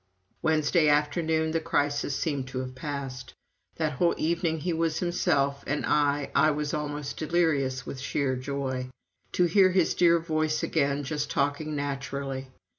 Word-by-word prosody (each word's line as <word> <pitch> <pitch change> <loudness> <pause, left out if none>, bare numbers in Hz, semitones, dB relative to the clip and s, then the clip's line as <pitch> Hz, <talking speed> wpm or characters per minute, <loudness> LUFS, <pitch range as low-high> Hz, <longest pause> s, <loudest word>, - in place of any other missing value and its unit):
Wednesday 155 0 +3
afternoon 160 +2 +1
the 165 - +1
crisis 145 -3 0
seemed 140 -4 -2
to 130 - -6
have 130 0 -6
passed. 130 -3 -6 0.4
That 155 -2 0
whole 170 +6 +1
evening 160 0 0
he 175 +1 -1
was 165 -1 0
himself, 140 -5 +1
and 145 +2 -1
I 145 -1 +1
I 140 +2 +5
was 150 -1 -2
almost 145 -1 -3
delirious 145 -6 +1
from 135 - -7
sheer 130 0 -1
joy. 130 -1 -3 0.4
To 180 - +3
hear 185 +2 +5
his 180 -2 +2
dear 170 -1 +5
voice 155 -2 -1
again 140 -2 +1
just 150 +1 -3
talking 145 +2 -1
naturally! 140 -1 -3
145 Hz, 150 wpm, -27 LUFS, 140-160 Hz, 0.4 s, I